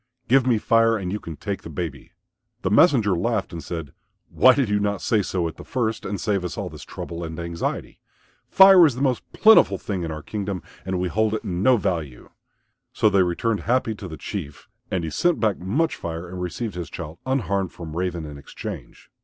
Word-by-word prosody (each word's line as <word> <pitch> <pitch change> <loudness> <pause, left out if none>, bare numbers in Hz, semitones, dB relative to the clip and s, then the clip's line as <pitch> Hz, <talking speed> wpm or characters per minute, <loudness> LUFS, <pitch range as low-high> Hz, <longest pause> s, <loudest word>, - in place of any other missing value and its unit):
Give 130 +1 +4
me 120 -3 +4
Fire 115 +1 +3
and 90 -3 -4
you 105 - -2
can 85 -5 -8
take - - -4
the - - -9
baby." - - -6 0.5
The 95 - 0
messenger 115 - +5
laughed 100 +1 -1
and 85 - -6
said, 80 -5 -6 0.4
"Why 130 0 +6
did 135 -4 +1
you 105 0 +1
not 100 -1 -1
say 110 -3 +1
so 90 -3 -1
at 80 - -8
first 115 -4 -2
and 100 0 -3
save 100 -4 0
us 90 - -5
all - - -3
this - - -10
trouble 85 0 -7
and 80 0 -6
anxiety? 85 0 -4 0.5
Fire 190 -1 +8
is 135 - -2
the 130 - -2
most 130 -3 +1
plentiful 220 +1 +6
thing 95 -3 -4
in 85 - -3
our 75 -1 -6
kingdom, 100 0 -4 0.2
and 95 -1 -1
we 90 - 0
hold 110 +4 +1
it - - -4
in 90 -1 -3
no 125 +4 +5
value." 80 - -3 0.6
So 110 - +2
they 100 -1 +4
returned 100 +5 0
happy 120 -2 0
to 100 -2 -8
the 80 -3 -8
Chief. 80 -7 -7 0.2
And 90 -2 -1
he 80 - -4
sent 170 - +1
back 110 -3 +1
much 140 - 0
Fire 85 +1 -6
and 90 +1 -7
received 100 +5 -4
his 85 -2 -6
child 75 +2 -8
unharmed 100 -8 0
from 80 -2 -8
Raven 90 -2 -2
in 75 -1 -9
exchange. - - -9
100 Hz, 210 wpm, -23 LUFS, 85-115 Hz, 0.6 s, Fire